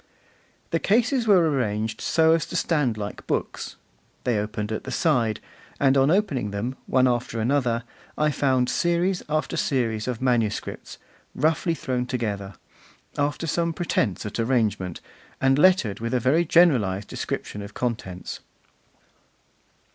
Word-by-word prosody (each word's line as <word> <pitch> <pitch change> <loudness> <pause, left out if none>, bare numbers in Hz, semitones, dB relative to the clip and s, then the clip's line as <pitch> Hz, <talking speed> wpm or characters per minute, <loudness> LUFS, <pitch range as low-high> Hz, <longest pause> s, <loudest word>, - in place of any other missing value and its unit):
The 165 - +1
cases 235 - +2
were 185 -5 +5
arranged 110 -6 -1
so 160 0 +4
as 165 -2 0
to - - -7
stand 140 -9 +1
like 105 -1 -6
books; - - -3 0.5
they 120 -4 +1
opened 105 0 -3
at 110 - -3
the - - -7
side; 120 - +1 0.4
and 135 -1 +4
on 135 +1 +4
opening 160 - +1
them, 105 +6 -3
one 130 0 +4
after 120 -1 -1
another, 120 -1 +1 0.3
I 150 0 +2
found 130 -3 +1
series 175 +5 +1
after 155 0 -1
series 115 -5 0
of 125 -3 -2
manuscripts 120 -5 -1 0.4
roughly 160 +3 +1
thrown 125 -4 -2
together, 100 -6 -3 0.6
after 145 +2 -1
some 170 +1 0
pretence 125 - -1
at 105 - -5
arrangement, 110 -7 0 0.4
and 135 +1 +3
lettered 180 - +4
with 115 +2 -2
a - - +3
very 140 +9 +2
generalised 125 - +3
description 105 - -4
of 100 +1 -9
contents. 110 -7 -4
125 Hz, 140 wpm, -24 LUFS, 110-155 Hz, 0.6 s, were